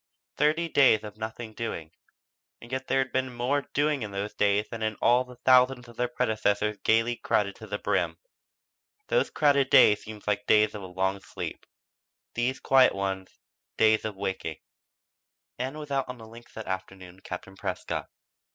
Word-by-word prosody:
'" -, -, -58 dB
Thirty 155 Hz, +3 st, +2 dB
days 135 Hz, -8 st, +4 dB
of 105 Hz, -1 st, -8 dB
"nothing 110 Hz, +1 st, -6 dB
doing" 85 Hz, -9 st, -5 dB, 0.7 s
and 120 Hz, -, -13 dB
yet 130 Hz, 0 st, -3 dB
there -, -, +1 dB
had 130 Hz, -1 st, 0 dB
been 130 Hz, 0 st, -1 dB
more 125 Hz, +4 st, -1 dB
"doing" 145 Hz, -1 st, +1 dB
in 110 Hz, -, -3 dB
those 100 Hz, +1 st, -4 dB
days 105 Hz, +1 st, +2 dB
than 115 Hz, -1 st, -7 dB
in 110 Hz, -1 st, -1 dB
all 120 Hz, +4 st, +3 dB
the 125 Hz, 0 st, -13 dB
thousands 125 Hz, -1 st, +5 dB
of 120 Hz, -, -14 dB
their 125 Hz, +1 st, 0 dB
predecessors 105 Hz, -3 st, 0 dB
gaily 115 Hz, +2 st, +2 dB
crowded 100 Hz, -2 st, 0 dB
to 110 Hz, -, -10 dB
the 105 Hz, 0 st, -3 dB
brim. -, -, -1 dB, 0.9 s
Those -, -, +2 dB
crowded 140 Hz, -3 st, +3 dB
days 105 Hz, -, +6 dB
seemed 110 Hz, -1 st, -9 dB, 0.2 s
days 105 Hz, 0 st, +4 dB
of 105 Hz, -, -6 dB
a 95 Hz, -, -7 dB
long 95 Hz, +2 st, -1 dB
sleep; -, -, -7 dB, 0.7 s
these 125 Hz, +2 st, -1 dB
quiet 130 Hz, -4 st, +5 dB
ones, 95 Hz, -1 st, -4 dB, 0.4 s
days 110 Hz, 0 st, +4 dB
of 110 Hz, -2 st, -4 dB
waking. 95 Hz, -5 st, -4 dB, 1.0 s
Ann 130 Hz, +4 st, -3 dB
was 150 Hz, -2 st, -8 dB
out 135 Hz, -2 st, 0 dB
on 125 Hz, -, -6 dB
the 110 Hz, -, -11 dB
links 115 Hz, +2 st, -14 dB
that 110 Hz, -, -6 dB
afternoon 95 Hz, -1 st, -6 dB
with 95 Hz, -, -22 dB
Captain 95 Hz, +1 st, -7 dB
Prescott. -, -, -4 dB
110 Hz, 180 wpm, -27 LUFS, 100-130 Hz, 1.0 s, days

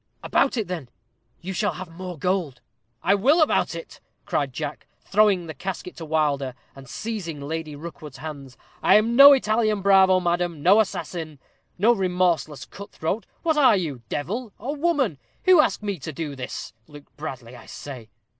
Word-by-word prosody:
_" -, -, -48 dB, 0.2 s
"About 275 Hz, -2 st, +2 dB
it, 220 Hz, -, -1 dB
then; 165 Hz, -8 st, -5 dB, 0.5 s
you 190 Hz, +2 st, -5 dB
shall -, -, 0 dB
have 185 Hz, 0 st, -7 dB
more 180 Hz, +1 st, -8 dB
gold." 170 Hz, -6 st, -1 dB, 0.4 s
"I 195 Hz, -, +4 dB
will 265 Hz, -, +4 dB
about 310 Hz, -, +2 dB
it," 165 Hz, -, -9 dB, 0.2 s
cried 140 Hz, -2 st, -1 dB
Jack, 150 Hz, +3 st, -6 dB
throwing 200 Hz, -3 st, +3 dB
the 160 Hz, -, -7 dB
casket 180 Hz, +4 st, -6 dB
to 165 Hz, -, -7 dB
Wilder, 145 Hz, -4 st, 0 dB, 0.2 s
and 135 Hz, -2 st, -13 dB
seizing 195 Hz, -, -5 dB
Lady 155 Hz, +1 st, -5 dB
Rookwood's 150 Hz, -3 st, -9 dB
hands. 140 Hz, -3 st, -8 dB, 0.2 s
"I -, -, +5 dB
am 225 Hz, +3 st, +3 dB
no 280 Hz, +2 st, +11 dB
Italian 215 Hz, -5 st, +1 dB
bravo, 190 Hz, -1 st, +6 dB
madam 175 Hz, -3 st, -1 dB
no 195 Hz, +5 st, +6 dB
assassin 165 Hz, -7 st, -3 dB, 0.4 s
no 220 Hz, +6 st, +5 dB
remorseless 180 Hz, -, 0 dB
cut 200 Hz, 0 st, -11 dB
throat. 190 Hz, +8 st, -3 dB, 0.2 s
What 320 Hz, -2 st, +1 dB
are 260 Hz, -8 st, +6 dB
you 150 Hz, -9 st, -4 dB
devil 210 Hz, -, -3 dB
or 280 Hz, +4 st, -4 dB
woman 285 Hz, -, 0 dB, 0.3 s
who 365 Hz, -4 st, +7 dB
ask 260 Hz, -, -1 dB
me 200 Hz, -4 st, -3 dB
to 160 Hz, -, -6 dB
do 150 Hz, -1 st, -5 dB
this? 130 Hz, -2 st, -6 dB
Luke 145 Hz, -1 st, -15 dB
Bradley, 130 Hz, -5 st, -7 dB
I -, -, -14 dB
say." 125 Hz, -6 st, -9 dB
175 Hz, 175 wpm, -24 LUFS, 150-210 Hz, 0.5 s, no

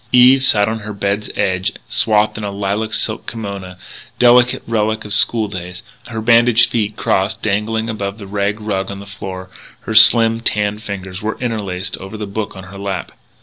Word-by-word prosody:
Eve 125 Hz, +2 st, +6 dB
sat 105 Hz, -6 st, +3 dB
on 110 Hz, 0 st, -2 dB
her 105 Hz, 0 st, -7 dB
bed's 100 Hz, +1 st, -2 dB
edge, 95 Hz, 0 st, 0 dB
swathed 105 Hz, -1 st, +2 dB
in 110 Hz, -, -6 dB
a 100 Hz, -, -2 dB
lilac 100 Hz, +2 st, -2 dB
silk 110 Hz, 0 st, -2 dB
kimona 100 Hz, -5 st, -6 dB, 0.4 s
delicate 125 Hz, +1 st, +4 dB
relic 110 Hz, -1 st, -1 dB
of 105 Hz, -, -2 dB
school 110 Hz, +1 st, +5 dB
days. 90 Hz, -2 st, -7 dB, 0.2 s
Her 115 Hz, -1 st, -5 dB
bandaged 115 Hz, +1 st, +4 dB
feet, 110 Hz, -3 st, -1 dB
crossed, 95 Hz, 0 st, -1 dB
dangled 110 Hz, +2 st, -1 dB
above 100 Hz, -3 st, -4 dB
the 105 Hz, -, -9 dB
rag 100 Hz, +1 st, -2 dB
rug 100 Hz, -3 st, -3 dB
on 100 Hz, 0 st, -6 dB
the 100 Hz, -, -10 dB
floor; 95 Hz, -2 st, -8 dB, 0.3 s
her -, -, -5 dB
slim, 115 Hz, +1 st, +6 dB
tanned 105 Hz, -2 st, -1 dB
fingers 95 Hz, -2 st, -7 dB
were 110 Hz, +1 st, -3 dB
interlaced 100 Hz, -6 st, -3 dB
over 95 Hz, +3 st, -9 dB
the 105 Hz, -, -4 dB
book 105 Hz, +1 st, -5 dB
on 95 Hz, -, -8 dB
her 100 Hz, +1 st, -11 dB
lap. 100 Hz, -3 st, -4 dB
105 Hz, 185 wpm, -17 LUFS, 100-110 Hz, 0.4 s, Eve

